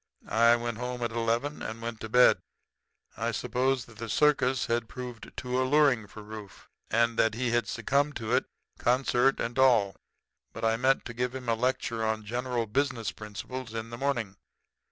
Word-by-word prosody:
I 115 +1 +5
went 120 -1 -3
home 125 0 -3
at 120 - -1
eleven 115 +6 -1
and 110 +1 -5
went 115 -1 -5
to 110 - -6
bed. 125 +2 +6 0.8
I - - -1
supposed 130 0 0
that 110 -3 -16
the 115 -1 -5
circus 135 -2 +3
had 115 -1 -1
proved 125 -3 -8
too 125 +1 -1
alluring 130 -5 +3
for 105 +2 -11
Rufe, 105 -2 -10 0.2
and 115 +1 +2
that 110 -1 +3
he 120 0 -1
had 120 0 +1
succumbed 140 +6 0
to 110 -2 -3
it, - - +3 0.3
concert 130 +1 +2
and 120 +3 -2
all; 115 -7 +4 0.6
but - - -4
I 115 0 +3
meant 130 +3 +2
to 120 - -6
give 125 +2 -2
him 130 -2 -6
a 115 - +3
lecture 115 -1 -1
on 110 -1 -1
general 120 +1 -2
business 120 -1 -1
principles 110 +3 -7
in 115 +1 -5
the - - -5
morning. 120 -8 -1
120 Hz, 180 wpm, -29 LUFS, 115-130 Hz, 0.8 s, bed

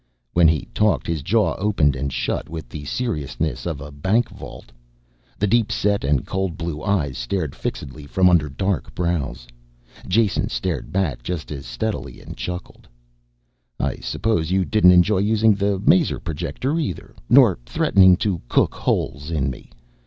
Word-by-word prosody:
When 85 -1 +5
he 80 -2 +1
talked 105 -2 +2
his 80 -3 -2
jaw 95 +2 +2
opened 95 -9 +2
and 70 +1 -3
shut - - -2
with 80 0 -7
the 75 -3 -8
seriousness 75 - -3
of 80 -5 -3
a 70 +2 -8
bank 95 +11 +1
vault. - - -11 0.7
The 105 - +1
deep 115 +2 +2
set 100 0 +1
and 70 -2 +1
cold 95 -3 -2
blue 85 -3 -4
eyes 80 -9 -1
stared 75 +4 -2
fixedly 70 +2 -6
from 90 +5 +3
under 85 -5 +3
dark 95 +3 -2
brows. 75 -9 -2 0.6
Jason 105 0 +1
stared 85 -9 -3
back 85 -11 -1
just 75 +6 -5
as 70 -2 -6
steadily - - -4
and - - -10
chuckled. 90 0 -7 0.9
"I - - -1
suppose 85 -8 -1
you 95 0 +2
didn't 105 -3 +5
enjoy 90 +3 +4
using 110 +2 +3
the 100 -1 0
maser 165 - +3
projector 90 - -3
either, 100 - -4 0.2
nor 120 - +6
threatening 95 -2 +5
to 95 -5 -1
cook - - +2
holes 70 +3 -2
in 75 -4 0
me. 65 - -11
90 Hz, 160 wpm, -22 LUFS, 75-100 Hz, 0.9 s, nor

